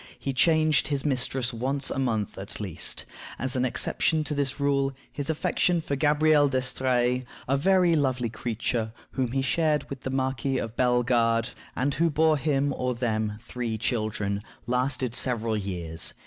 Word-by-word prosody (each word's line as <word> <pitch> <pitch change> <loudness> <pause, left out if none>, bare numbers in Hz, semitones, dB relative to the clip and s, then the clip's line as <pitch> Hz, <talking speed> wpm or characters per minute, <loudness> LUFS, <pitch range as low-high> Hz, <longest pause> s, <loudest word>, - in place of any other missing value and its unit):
He 135 - -3
changed 155 +1 +3
his 140 -1 -2
mistress 130 -2 0
once 130 +4 -1
a - - -2
month 110 -6 -1
at 95 +2 -7
least. 95 -6 -1 0.3
As 130 +1 -1
an 130 0 +1
exception 155 +5 +1
to 150 - -3
this 140 -1 -1
rule, 140 -1 +1 0.2
his 145 +1 -3
affection 170 +2 +1
for 145 -3 -2
Gabrielle 150 0 +4
d'Estrées, 130 -1 +1 0.2
a 135 - +2
very 180 +3 +4
lovely 130 -5 +1
creature, 115 0 -2 0.2
whom 130 -3 -1
he 135 0 +1
shared 150 +1 +1
with 135 -1 -6
the 130 - -4
Marquis 130 0 -1
of 115 0 -4
Bellegarde, 120 -1 +2 0.3
and 140 +3 0
who 165 +3 +2
bore 155 +1 +3
him, 140 -1 +1
or 125 -1 -1
them, 110 -3 -1
three 120 -3 -3
children, 105 -2 -1 0.2
lasted 125 0 0
several 115 -3 0
years. 90 -5 -2
130 Hz, 160 wpm, -27 LUFS, 115-145 Hz, 0.3 s, Gabrielle